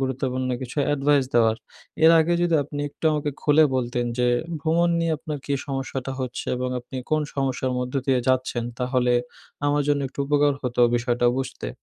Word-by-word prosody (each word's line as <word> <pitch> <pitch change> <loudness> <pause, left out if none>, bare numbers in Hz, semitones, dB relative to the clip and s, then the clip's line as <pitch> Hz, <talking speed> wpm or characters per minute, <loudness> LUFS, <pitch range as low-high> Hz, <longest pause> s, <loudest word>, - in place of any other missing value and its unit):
গুরুত্বপূর্ণ 130 -1 -2
কিছু 130 +3 -7
অ্যাডভাইস 145 -1 +2
দেওয়ার, 115 -1 +4 0.5
এর 165 - +9
আগে 170 +2 +1
যদি 170 -2 +2
আপনি 145 0 -6
একটু 150 - -13
আমাকে 150 -1 -1
খুলে 155 +1 +5
বলতেন 120 -1 -1
যে, 125 - +3 0.3
ভ্রমণ 170 +3 +2
নিয়ে 165 -1 +1
আপনার 150 -2 -5
কী 140 - -1
সমস্যাটা 135 -1 -4
হচ্ছে 125 -1 -4
এবং 125 0 -2
আপনি 125 +2 -10
কোন 155 0 +3
সমস্যার 130 -2 -1
মধ্য 125 +1 -4
দিয়ে 130 -2 +3
যাচ্ছেন? 130 -2 0
তাহলে 125 -1 +1 0.5
আমার 145 0 +2
জন্য 145 -1 +2
একটু 135 - -24
উপকার 145 0 +3
হতো 125 -1 -1
বিষয়টা 120 0 +1
বুঝতে। 135 - -4
135 Hz, 175 wpm, -24 LUFS, 125-145 Hz, 0.5 s, এর